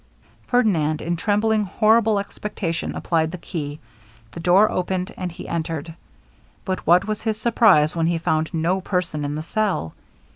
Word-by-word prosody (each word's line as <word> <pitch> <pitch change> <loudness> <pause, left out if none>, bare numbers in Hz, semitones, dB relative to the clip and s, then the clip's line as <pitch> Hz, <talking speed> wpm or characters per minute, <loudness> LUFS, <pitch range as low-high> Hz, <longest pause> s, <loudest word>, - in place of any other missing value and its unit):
Ferdinand, 170 - +2
in 170 +2 -2
trembling 210 +3 +1
horrible 220 +2 +3
expectation, 200 -4 -4
applied 160 -2 0
the 180 - -6
key; 150 -4 -6 0.5
the 170 - -8
door 180 +5 +4
opened, 185 +2 -2
and 180 -1 -4
he 170 - -9
entered; 165 -1 -3 0.7
but 185 -4 -3
what 175 +2 +5
was 215 -1 -3
his 220 -1 -1
surprize 215 -10 +4
when 165 -1 +1
he 170 0 +1
found 160 -1 0
no 175 +3 0
person 180 -5 -2
in 145 +1 -3
the 155 - -4
cell! 195 - -1
180 Hz, 155 wpm, -22 LUFS, 160-210 Hz, 0.7 s, what